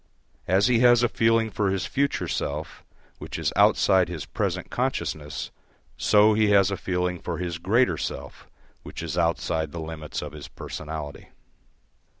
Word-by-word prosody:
As 95 +3 +3
he 120 -1 +3
has 120 0 +6
a - - +5
feeling 115 -1 +2
for 100 -1 0
his 95 -1 -1
future 140 +1 -1
self 75 +2 -4 0.4
which - - -6
is - - -1
outside 95 -2 +4
his 85 -4 -5
present - - -3
consciousness, 75 -1 -3 0.4
so 105 +1 +4
he 110 0 +3
has 100 -1 +4
a - - 0
feeling 90 -1 -2
for - - -4
his 85 -1 -4
greater 115 +9 +2
self - - -6 0.3
which - - -8
is 80 -1 -4
outside 85 -2 0
the 85 - -6
limits 80 -2 -5
of 75 - -6
his 75 -2 -9
personality. 75 -2 -7
90 Hz, 155 wpm, -25 LUFS, 80-110 Hz, 0.4 s, has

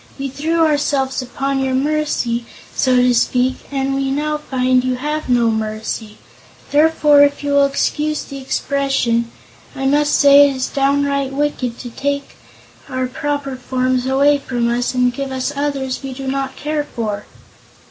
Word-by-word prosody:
We 275 0 -3
threw 320 +5 +1
ourselves 285 -3 0
upon 270 +2 -2
your 265 -1 0
mercy, 265 -5 -1 0.3
so 255 -1 +2
to 250 0 +4
speak, 250 +2 +1
and 270 -1 -1
we 270 0 -1
now 300 +2 -1
find 255 -3 +1
you 255 0 0
have 300 +3 -3
no 240 -2 +3
mercy. 215 0 -4 0.5
Therefore, 300 -1 +5
if 285 0 +3
you 285 - -1
will 280 0 +5
excuse 300 +2 -1
the 275 -1 -8
expression, 265 -3 0 0.5
I 270 - -3
must 295 +2 +3
say 285 0 +7
it 275 - -4
is 260 - -2
downright 280 0 0
wicked 270 -4 -2
to 245 - -8
take 280 +3 -3 0.5
our 255 -1 -1
proper 285 0 -3
forms 255 0 -1
away 280 +2 +3
from 240 -3 -1
us 245 +2 -1
and 250 0 +2
give 275 +1 -4
us 260 +2 -2
others 275 -2 -2
that - - -19
we 265 - -6
do 270 +1 -7
not 270 0 -2
care 300 0 -2
for." 215 -7 -5
270 Hz, 165 wpm, -18 LUFS, 255-285 Hz, 0.5 s, say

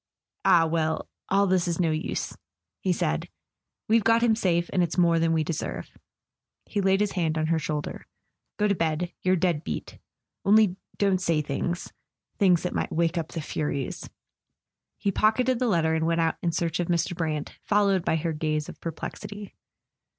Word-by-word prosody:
"Ah, 165 -1 +6
well, 160 -1 -1 0.2
all 200 +1 +4
this 185 -2 +2
is 170 0 -1
no 165 -3 +2
use," 155 0 -3 0.4
he 185 - 0
said; 75 - -1 0.6
"we've 225 0 +4
got 230 +1 +4
him 225 -2 +4
safe, 175 -5 +1
and 185 - +3
it's 175 0 -1
more 170 -2 +4
than 165 0 +2
we 160 -1 +2
deserve." 160 0 -4 0.7
He 205 - -2
laid 195 +1 +3
his 210 -1 +1
hand 160 -4 0
on 155 - +1
her 160 0 +1
shoulder. 150 0 -4 0.5
"Go 210 - +2
to 200 - +3
bed; 165 0 -1
you're 185 0 +3
dead 170 -3 +1
beat. - - -5 0.4
Only 205 -2 +5 0.2
don't 195 -2 +2
say 165 -4 +1
things—things 175 +4 -1
that 180 - -2
might - - -2
wake 165 +1 +1
up 160 - -3
the 165 - -5
Furies.. 145 -3 -3 0.5
." - - -61
He 200 - +2
pocketed 235 +5 +2
the 250 - +1
letter 165 -6 +2
and 160 - +1
w 165 +1 +2
T - - -1
ent - - +4
out - - -7
in 170 - 0
search 165 0 -1
of 175 - 0
Mr. 175 +1 0
Brant, 155 -3 -3
followed 200 -3 +2
by - - +1
her 160 +1 -1
gaze 155 -1 -1
of - - -11
perplexity. 205 +5 -6
170 Hz, 185 wpm, -26 LUFS, 160-195 Hz, 0.7 s, Ah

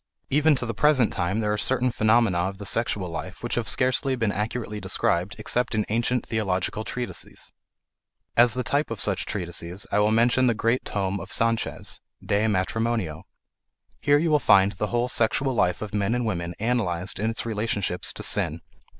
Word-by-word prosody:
Even 150 +2 +4
to 125 - -4
the 115 - -3
present 135 0 +3
time 95 +5 -1
there 105 -1 0
are 105 - -2
certain 125 +2 +1
phenomena 110 -4 +3
of 95 - -9
the 100 - -8
sexual 105 -4 -1
life 85 +4 -7
which 120 - -2
have 115 -3 0
scarcely 130 +1 +2
been 115 -4 0
accurately 105 0 -3
described 90 +4 0
except 125 -1 -1
in 105 - +1
ancient 120 +2 0
theological 105 -1 -1
treatises. 125 +2 -5 0.8
As 120 0 +5
the 125 - -1
type 145 +5 0
of 115 -3 -5
such 100 -1 +1
treatises 90 -1 -3
I 105 - +2
will 105 +1 +3
mention 120 +3 +3
the 120 - +2
great 115 +3 +1
tome 100 -1 -2
of 95 - -9
Sanchez, 115 0 -1 0.2
De 105 +2 +1
Matrimonio. 105 -4 -1 0.7
Here 145 +10 +4
you 160 +2 +1
will 150 - +5
find 100 -6 +5
the 105 +2 -3
whole 120 +2 0
sexual 125 +3 +1
life 90 -4 +1
of 105 - -7
men 105 +2 +1
and 125 -1 -1
women 85 -5 -3
analyzed 100 -7 0
in 110 +2 0
its 115 - -4
relationships 105 -5 -1
to - - -7
sin. - - 0
110 Hz, 185 wpm, -25 LUFS, 100-120 Hz, 0.8 s, As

